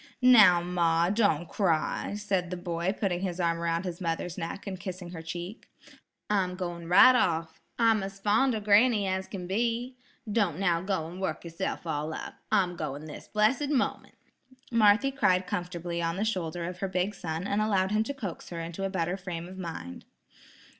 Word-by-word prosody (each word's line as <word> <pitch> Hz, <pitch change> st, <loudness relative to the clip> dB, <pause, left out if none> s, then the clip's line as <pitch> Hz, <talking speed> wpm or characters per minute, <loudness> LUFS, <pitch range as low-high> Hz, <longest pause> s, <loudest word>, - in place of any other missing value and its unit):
"Now, 215 Hz, -9 st, +8 dB
ma, 170 Hz, -1 st, +2 dB
don't 200 Hz, -7 st, +2 dB
cry," 180 Hz, +1 st, 0 dB
said 195 Hz, -4 st, -1 dB
the 180 Hz, -, -4 dB
boy 175 Hz, 0 st, -2 dB
putting 180 Hz, -4 st, 0 dB
his 185 Hz, -2 st, -3 dB
arm 170 Hz, -1 st, +1 dB
about 170 Hz, +2 st, -1 dB
his 180 Hz, 0 st, -5 dB
mother's 170 Hz, 0 st, -2 dB
neck 170 Hz, +2 st, -5 dB
and 190 Hz, -3 st, -5 dB
kissing 180 Hz, -1 st, -6 dB
her 165 Hz, -2 st, -7 dB
cheek. 175 Hz, +6 st, -7 dB, 0.6 s
"I'm 190 Hz, -3 st, 0 dB
going 175 Hz, -2 st, -5 dB
right 255 Hz, +8 st, +8 dB
off. 165 Hz, -8 st, 0 dB, 0.2 s
I'm 225 Hz, -2 st, +4 dB
as 195 Hz, 0 st, -6 dB
fond 225 Hz, +5 st, +2 dB
of 215 Hz, -, -4 dB
granny 210 Hz, +1 st, +4 dB
as 190 Hz, 0 st, -2 dB
can 185 Hz, -3 st, -6 dB
be. 235 Hz, +6 st, -1 dB, 0.3 s
Don't 200 Hz, -8 st, +1 dB
now 175 Hz, -3 st, +1 dB
go 190 Hz, -4 st, -1 dB
and 175 Hz, +3 st, -8 dB
work 190 Hz, -, -2 dB
yourself 170 Hz, +2 st, -4 dB
all 155 Hz, 0 st, -2 dB
up. -, -, -6 dB, 0.2 s
I'm 190 Hz, -4 st, +2 dB
going 145 Hz, -2 st, -5 dB
this 155 Hz, -, -9 dB
blessed 225 Hz, +7 st, +2 dB
moment." 280 Hz, -4 st, -1 dB, 0.6 s
Marthy 225 Hz, +3 st, +4 dB
cried 190 Hz, -9 st, +2 dB
comfortably 175 Hz, -1 st, -3 dB
on 165 Hz, 0 st, -1 dB
the 210 Hz, -, 0 dB
shoulder 175 Hz, -5 st, -2 dB
of 180 Hz, +1 st, -6 dB
her 195 Hz, -, -1 dB
big 185 Hz, +2 st, -1 dB
son 165 Hz, -1 st, -4 dB
and 200 Hz, +1 st, 0 dB
allowed 195 Hz, -3 st, +1 dB
him 215 Hz, +1 st, +2 dB
to 280 Hz, -, -3 dB
coax 200 Hz, -11 st, -6 dB
her 170 Hz, -, -5 dB
into 165 Hz, +3 st, -5 dB
a 195 Hz, -, 0 dB
better 180 Hz, -1 st, -1 dB
frame 175 Hz, -3 st, -6 dB
of 190 Hz, +1 st, -10 dB
mind. 165 Hz, -, -7 dB
185 Hz, 190 wpm, -28 LUFS, 170-205 Hz, 0.6 s, Now